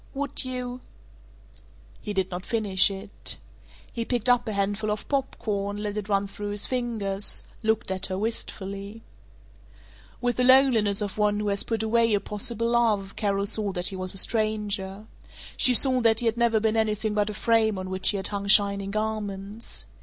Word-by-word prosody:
"Would 285 +1 -2
you 250 -1 -5 0.6
" - - -26
He 210 - -5
did 190 -2 -1
not 180 +1 -5
finish 205 -5 +3
it. 195 +1 -4 0.6
He 230 - -3
picked 245 0 -1
up 245 -1 +3
a 215 - -2
handful 205 +2 -1
of 210 0 -4
pop 270 -2 -1
corn, 205 -1 -3
let 210 0 -4
it 210 -1 -5
run 200 0 +1
through 205 +1 -7
his 205 0 0
fingers, 220 -6 -1 0.2
looked 220 -3 0
at 190 0 -3
her 185 -1 -4
wistfully. 200 -1 -5 1.2
With 245 -1 -1
the 250 - +2
loneliness 250 -6 +4
of 205 +1 -6
one 210 0 +2
who 210 -1 -1
has 200 0 0
put 225 -1 -2
away 230 +1 +2
a - - +1
possible 230 +3 -2
love 215 -5 +1
Carol 200 -1 -1
saw 205 0 0
that 180 -1 +2
he 195 - -6
was 185 0 +6
a - - -1
stranger. 210 -2 0 0.5
She 250 - +6
saw 255 0 +6
that 225 -1 +3
he 240 - -1
had 225 -1 +1
never 235 -2 +2
been 220 0 0
anything 215 -1 0
but 210 0 0
a 210 - -6
frame 220 -2 +2
on 185 0 -6
which 190 0 0
she 205 - +3
had 190 - -1
hung 200 -1 -4
shining 200 -1 +3
garments. 210 0 -4
210 Hz, 190 wpm, -25 LUFS, 200-230 Hz, 1.2 s, was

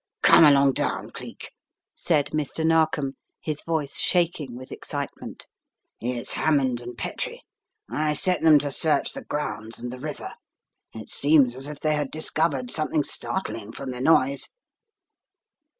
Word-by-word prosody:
"Come - - +8
along 140 -2 +5
down, - - -2
Cleek," - - -8 0.4
said 150 -5 0
Mr. 155 +1 -1
Narkom, 155 -4 +1 0.2
his 155 -1 -4
voice 160 -4 -1
shaking 165 -8 +1
vzith 130 +1 -11
excitement. - - -6 0.5
"It's 120 0 -3
Hammond 135 -6 +1
and 120 0 -9
Petrie. 105 - -4 0.4
I 150 0 0
set 180 +4 +2
them 160 -2 +7
to 145 0 -1
search 155 +3 +1
the - - -7
grounds 115 -6 -4
and 120 +1 -5
the 125 - -8
river. 150 +1 -6 0.6
It 110 -2 -9
seems 140 -4 +4
as 135 +2 -4
if 150 -1 -8
they 155 -1 +2
had 145 -2 -1
discovered 155 -4 -1
something 155 -1 0
startling 115 - -2
from 135 0 -6
the 125 0 -6
noise." 140 -2 +3
145 Hz, 145 wpm, -25 LUFS, 130-155 Hz, 0.6 s, Come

